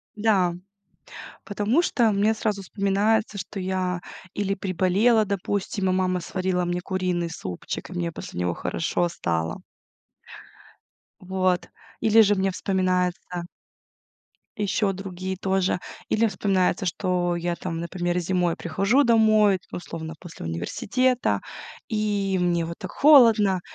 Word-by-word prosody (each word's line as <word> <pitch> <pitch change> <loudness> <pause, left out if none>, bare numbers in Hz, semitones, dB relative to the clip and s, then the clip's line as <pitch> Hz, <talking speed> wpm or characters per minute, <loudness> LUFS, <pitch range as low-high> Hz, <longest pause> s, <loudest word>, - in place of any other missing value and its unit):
Да. 205 -5 +2 0.9
Потому 210 +9 +1
что 235 -10 +2
мне 205 +2 +2
сразу 210 -2 -2
вспоминается, 200 +2 0
что 195 +1 -6
я 185 -1 -2 0.3
или 200 -1 -1
приболела, 195 +5 +2
допустим, 200 0 -2
и - - +2
мама 185 -1 +1
сварила 180 0 -1
мне 175 0 -2
куриный 180 -2 -1
супчик, 90 - -6
и - - -8
мне 175 -1 -2
после 90 - -8
него 90 -1 0
хорошо 170 - -1
стало. 80 - -2 1.6
Вот. 185 -1 0 0.3
Или 225 +1 +5
же 205 -1 +4
мне 195 0 +1
вспоминается 180 -2 -1 1.1
ещё 205 0 +1
другие 190 0 -5
тоже, 190 -1 0 0.3
или 225 +1 +3
вспоминается, 190 -2 0
что 180 0 0
я 175 0 -2
там, 170 -2 -5
например, 175 +1 -2
зимой 175 -1 0
прихожу 195 - +2
домой 215 -4 +4
условно 165 -2 -6
после 175 - -10
университета, 230 - 0 0.5
и 205 -3 0
мне 170 -1 +1
вот 170 +1 -6
так - - -7
холодно 225 -10 +6
190 Hz, 120 wpm, -25 LUFS, 175-205 Hz, 1.6 s, холодно